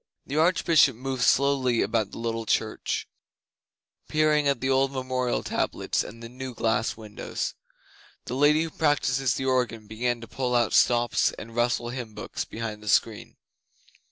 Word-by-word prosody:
The 140 - -5
Archbishop 160 -4 +4
moved 130 +1 -4
slowly 130 -2 +3
about 110 -4 0
the - - -10
little 115 -1 -3
church, - - -1 1.0
peering 155 -1 +2
at 140 -3 +1
the 130 - -2
old 135 0 +2
memorial 130 -2 -1
tablets - - -1
and 115 +1 -10
the - - -6
new 125 +1 -7
glass 110 -1 0
windows. 105 -2 -5 0.7
The - - -5
Lady 145 +4 +4
who 165 - -5
practises 135 -4 +1
the 135 - -3
organ 125 -4 0
began 120 +3 -2
to 115 - -9
pull 125 0 -2
out 120 -2 +2
stops 120 -1 +3
and 115 +1 -10
rustle 120 0 +1
hymn 120 -4 -6
books - - -5
behind 110 -2 -6
the 105 - -5
screen. - - +1
125 Hz, 155 wpm, -26 LUFS, 115-135 Hz, 1.0 s, Archbishop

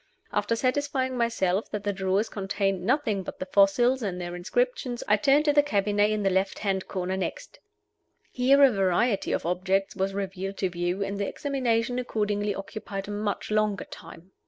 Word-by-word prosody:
After 230 - +1
satisfying 260 +1 0
myself 225 -5 0
that 210 -1 -4
the 205 0 -1
drawers 190 +3 0
contained 195 -2 -2
nothing 230 -3 +1
but 185 - -7
the - - -4
fossils 205 +7 +3
and 190 -5 -3
their 175 0 -5
inscriptions, 245 +6 -1
I 210 - +5
turned 275 +8 +3
to 295 - +4
the 290 - +6
cabinet 205 -5 +1
in 215 -1 -1
the 195 - +2
left 190 +1 0
hand 195 -2 -1
corner 185 -1 -2
next. - - -5 0.7
Here 270 +3 +4
a 270 - +7
variety 195 +2 +1
of - - -1
objects 190 +3 0
was 195 0 -1
revealed 195 0 -4
to 190 - 0
view, 175 +3 -1
and 200 +1 -4
the 200 - -1
examination 245 -3 -1
accordingly 210 -4 -1
occupied 195 0 -6
a - - -3
much 205 0 -3
longer 215 -2 +1
time. 180 +3 -12
205 Hz, 180 wpm, -27 LUFS, 190-240 Hz, 0.7 s, a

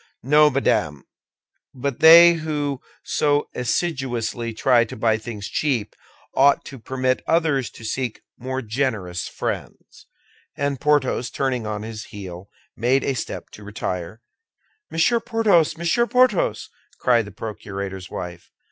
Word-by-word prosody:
"No, 150 +4 +5
madame; 75 - 0 0.7
but 135 0 -3
they 170 +2 +9
who 150 -4 -3 0.2
so 145 0 +1
assiduously 125 -4 -2
try 120 +2 +3
to 115 - -8
buy 110 0 +2
things 110 -3 -6
cheap 125 -9 -1 0.4
ought 140 +1 +4
to 135 - -9
permit 130 +2 -1
others 155 -6 +1
to - - -14
seek 120 +1 -3
more 130 +1 -4
generous 110 -7 -2
friends." - - -6 0.5
And 140 -2 -2
Porthos, 140 -5 +1
turning 130 -5 -2
on 105 -1 -4
his 110 -1 -7
heel, 95 -1 -9 0.3
made 130 +4 +2
a 135 - 0
step 120 - -6
to 105 - -12
retire. 100 0 -5 0.7
"Monsieur 230 +9 +2
Porthos! 205 -9 +2
Monsieur 170 +8 +1
Porthos!" 250 -6 +2 0.3
cried 120 -3 +3
the 105 - -10
procurator's 100 -2 -6
wife. 85 -1 -7
130 Hz, 130 wpm, -22 LUFS, 110-145 Hz, 0.7 s, they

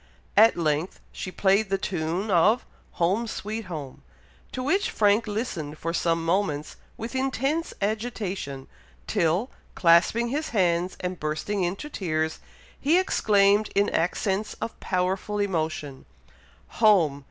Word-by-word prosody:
At 220 0 +6
length 155 +1 -1
she - - -6
played 195 +2 +2
the 195 - +1
tune 180 +3 -2
of 205 +7 +4 0.3
"Home! 195 +7 +1
sweet 215 +1 -5
home," 150 -7 -7 0.5
to 255 - -4
which 380 +10 +1
Frank 210 +2 +2
listened 175 -9 -4
for 165 +2 -3
some 165 -1 0
moments 165 -4 0 0.2
with 230 +2 -6
intense 270 +5 0
agitation, 200 - -3 0.4
till, 175 - +1 0.2
clasping 180 +7 +4
his 300 +5 -2
hands 175 -1 +1
and 180 -1 -3
bursting 155 +7 -2
into 190 +11 -3
tears, 160 - -2 0.4
he 310 +6 +3
exclaimed, 210 - +3
in 200 +1 +3
accents 195 +4 -1
of 230 - -6
powerful 190 +3 -1
emotion, 160 -8 -2 0.8
"Home! 175 -10 +5
195 Hz, 125 wpm, -26 LUFS, 165-220 Hz, 0.8 s, At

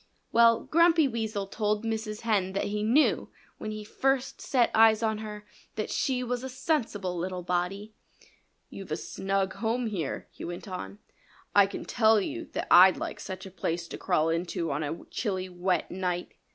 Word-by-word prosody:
Well, 230 -1 +5
Grumpy 330 -2 +4
Weasel 220 -4 -2
told 210 +2 -1
Mrs. 220 -1 -3
Hen 200 -5 +1
that 195 - 0
he 210 +1 -2
knew, 240 +8 +3 0.3
when - - -5
he 215 0 -5
first 270 +4 -1
set 250 -4 +2
eyes 220 0 +5
on 220 -1 0
her, 210 -1 -7 0.3
that 215 - -3
she 255 -2 0
was 250 0 -2
a 265 - -4
sensible 245 - -1
little 180 +1 -3
body. 180 +4 -2 0.8
"You've 195 -5 -9
a 155 - 0
snug 195 +2 -2
home 225 +4 -1
here," 185 -11 -3
he - - -10
went 175 +4 -6
on. 100 - -6 0.6
"I 200 -1 +6
can - - -7
tell 220 -2 +4
you 200 - -4
that - - -2
I'd 185 +1 +8
like - - -5
such 190 0 -7
a 190 - -9
place 170 -2 -3
to - - -6
crawl 155 +1 +1
into 165 -1 -1
on 145 +2 -1
a 155 +2 -4
chilly, 185 -4 -2
wet 180 0 -1
night." 180 -1 -3
210 Hz, 180 wpm, -28 LUFS, 185-225 Hz, 0.8 s, I'd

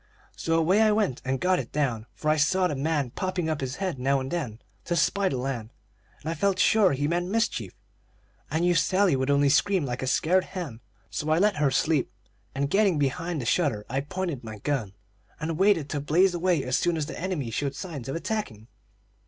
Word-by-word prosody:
So 165 - -1
away 180 +6 +3
I 215 -1 +5
went 210 - 0
and 130 0 -1
got 185 0 +2
it - - -6
down; 125 -7 -1
for 155 - -2
I - - +3
saw 155 +5 +2
the 175 - 0
man 145 -2 -1
popping 185 0 -2
up 155 -2 -2
his 130 0 -3
head 185 -8 -3
now 135 +2 +2
and 130 0 -5
then 125 -11 -3 0.3
to 175 - -1
spy 195 +4 +2
the 130 - -2
land, 125 -4 -3 0.5
and - - -10
I 165 - 0
felt 200 +1 +1
sure 200 -2 +4
he 145 +2 0
meant 175 +2 0
mischief. 200 - -1 0.7
I 160 +2 0
knew 175 0 +3
Sally 185 +1 +3
would 130 +1 -1
only 140 0 +4
scream 180 +3 +3
like 125 -1 -4
a 130 - -2
scared 180 +7 +2
hen, 160 -12 -6 0.3
so 150 - -3
I 155 - +3
let 205 +2 +3
her 150 -2 +3
sleep; 145 +2 +1 0.4
and 140 +1 0
getting 195 +1 +3
behind 165 +3 -1
the - - -5
shutter 115 -6 +1
I 135 +2 0
pointed 170 -3 -4
my 110 -1 -7
gun, 110 -4 -2 0.5
and 160 +1 -3
waited 190 -7 +3
to 145 - -1
blaze 175 +7 +3
away 175 -4 +1
as 125 0 0
soon 175 -1 +1
as 155 - -1
the 160 - -7
enemy 165 -10 -2
showed 140 +4 -2
signs 145 -9 -6
of 135 - -3
attacking. 165 - -4
155 Hz, 215 wpm, -26 LUFS, 135-180 Hz, 0.7 s, I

